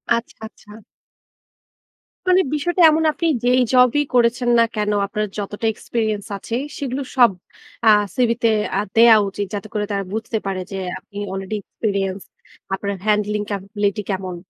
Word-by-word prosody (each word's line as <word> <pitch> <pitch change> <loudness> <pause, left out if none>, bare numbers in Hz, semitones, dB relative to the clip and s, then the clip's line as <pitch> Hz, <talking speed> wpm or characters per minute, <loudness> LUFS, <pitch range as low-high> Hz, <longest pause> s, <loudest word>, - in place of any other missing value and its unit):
আচ্ছা, 235 +1 -5
আচ্ছা। 220 -1 -15 1.6
মানে 365 +1 +5
বিষয়টা 350 +4 0
এমন 315 +1 +1
আপনি 335 +2 -2 0.2
যেই 250 +1 +4
জবই 250 +3 +5
করেছেন 240 0 +2
না - - +6
কেন, 210 -1 0
আপনার 210 +2 -2
যতটা 205 +2 -4
এক্সপেরিয়েন্স 215 -2 -3
আছে 225 - -5 0.2
সেগুলো 270 -1 -3 0.2
সব 240 -4 +7 0.5
আ - - +7 0.3
সিভি 240 -2 +2
তে 230 - +5 0.3
আ - - +2 0.2
দেয়া 230 0 +8
উচিত। 205 +1 -4
যাতে 205 +1 -4
করে 210 -1 -1
তারা 200 -1 -1
বুঝতে 225 +1 -2
পারে 190 -1 -2
যে - - -4 0.2
আপনি 200 - -14
আলরেডি 195 +2 -4
এক্সপেরিয়েন্স, 195 -2 -3 0.5
আপনার 200 +1 -3
হ্যান্ডলিং 210 0 +1
ক্যাপাবিলিটি 200 +1 -2
কেমন? 190 -2 -3
215 Hz, 150 wpm, -20 LUFS, 200-240 Hz, 1.6 s, দেয়া